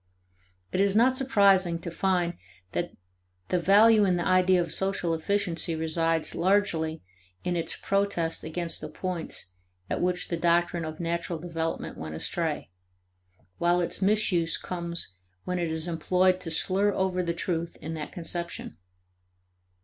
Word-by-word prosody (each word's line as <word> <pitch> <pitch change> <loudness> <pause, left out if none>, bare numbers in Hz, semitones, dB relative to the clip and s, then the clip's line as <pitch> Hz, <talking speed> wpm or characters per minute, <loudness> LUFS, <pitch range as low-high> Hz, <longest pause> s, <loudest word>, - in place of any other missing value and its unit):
It - - -1
is 200 0 +2
not 250 +4 +5
surprising 200 -9 +4
to 170 - -5
find 175 -1 +1 0.4
that 175 0 -3 0.5
the 180 - +2
value 210 +4 +6
in 185 -3 +3
the 175 - -1
idea 185 0 +4
of 170 - -1
social 190 -3 0
efficiency 170 -1 0
resides 160 0 0
largely 170 -4 +1 0.4
in 180 - -1
its 170 - -1
protest 195 -5 -1
against 165 +1 -3
the 155 - -6
points 165 - -4 0.4
at - - -1
which 180 0 0
the 170 - -1
doctrine 170 0 +2
of 155 0 -6
natural 170 0 -2
development 165 0 -4
went 80 0 -5
astray; 160 - -2 0.9
while 175 +1 +3
its 175 +2 -1
misuse 190 -5 +2
comes 170 - -3 0.3
when 180 0 -2
it 170 -2 -1
is 160 +1 -1
employed 180 +2 +2
to 165 - -4
slur 195 +5 +2
over 185 -1 0
the 170 -1 -2
truth 170 -1 -3
in 160 +1 -5
that 155 -2 -5
conception. 170 - -5
175 Hz, 145 wpm, -27 LUFS, 165-185 Hz, 0.9 s, value